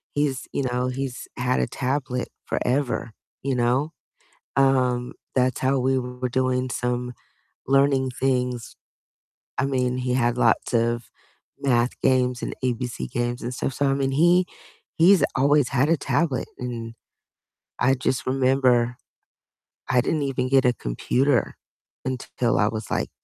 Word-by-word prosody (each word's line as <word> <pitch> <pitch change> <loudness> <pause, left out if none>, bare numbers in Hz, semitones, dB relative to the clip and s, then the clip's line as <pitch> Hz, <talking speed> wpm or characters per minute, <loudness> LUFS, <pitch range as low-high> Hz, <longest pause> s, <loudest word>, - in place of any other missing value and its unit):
he's, 145 -3 0
you 140 - 0
know, 125 0 -1
he's 130 0 -4
had 125 +1 +1
a - - +1
tablet 130 -1 -2 0.2
forever, 130 -3 -1 0.3
you 135 -1 -1
know? 125 +6 +1 0.6
Um, 130 -2 +2 0.2
that's 125 -1 +2
how 135 +1 +2
we 130 +1 +2
were 125 0 -4
doing 130 0 0
some 125 0 -2 0.6
learning 135 -1 +3
things. 125 -2 -1 0.8
I - - +2
mean, 125 -2 0
he 125 0 -1
had 120 -1 +1
lots 115 -2 +2
of 120 +1 +1 0.6
math 125 -3 +1
games 125 -1 +2
and - - -3
ABC 120 - -2
games 120 0 -2
and 120 +2 -3
stuff. 130 - -2
So 140 - +1
I 135 - +2
mean, 135 -1 0
he 175 +5 +4 0.5
he's 180 0 +6
always 145 -1 +3
had 140 +2 +2
a 165 - +4
tablet, 145 -3 0
and 115 -2 -5 0.9
I 135 +2 +4
just 130 0 -1
remember 130 -2 +2 0.9
I 125 - +4
didn't 155 +3 -1
even 130 -2 -1
get 135 -1 +4
a 125 - +4
computer 125 - 0 0.5
until 125 -2 -1
I 105 - +4
was 110 0 -4
like, - - -1
130 Hz, 140 wpm, -24 LUFS, 125-135 Hz, 0.9 s, he's